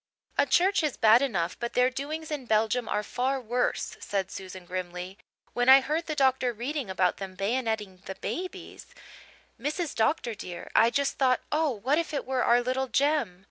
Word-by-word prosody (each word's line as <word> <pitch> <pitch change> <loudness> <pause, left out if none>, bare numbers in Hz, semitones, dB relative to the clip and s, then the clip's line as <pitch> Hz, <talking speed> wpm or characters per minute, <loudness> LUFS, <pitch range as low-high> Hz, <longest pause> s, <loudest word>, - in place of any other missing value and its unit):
"A - - +3
church 380 +3 +3
is 300 -4 -1
bad 225 +2 +6
enough 190 -12 -1
but 235 0 -4
their 250 +1 +3
doings 310 +4 -5
in 280 -5 -4
Belgium 220 +2 +1
are 210 - 0
far 255 +5 -1
worse," 245 0 -1
said 195 -2 -3
Susan 185 -1 -8
grimly. 180 +2 -6 0.3
"When 245 +1 +2
I 265 +1 +10
heard 310 +5 -2
the 310 - -2
doctor 265 -3 +2
reading 255 +1 -4
about 185 -1 +1
them 190 -1 -7
bayonetting 210 -3 -2
the 190 - -6
babies, 365 - -6 0.7
Mrs. 300 +5 -2
Dr. 235 +1 0
dear, 180 -4 -8
I 230 - +6
just 280 +3 -1
thought, 255 -2 +3
'Oh, 310 +1 +2
what 260 +6 0
if 325 -2 -3
it - - -2
were 260 -1 0
our 240 +1 +4
little 255 +2 -1
Jem!' 270 -7 +1
250 Hz, 180 wpm, -28 LUFS, 205-280 Hz, 0.7 s, I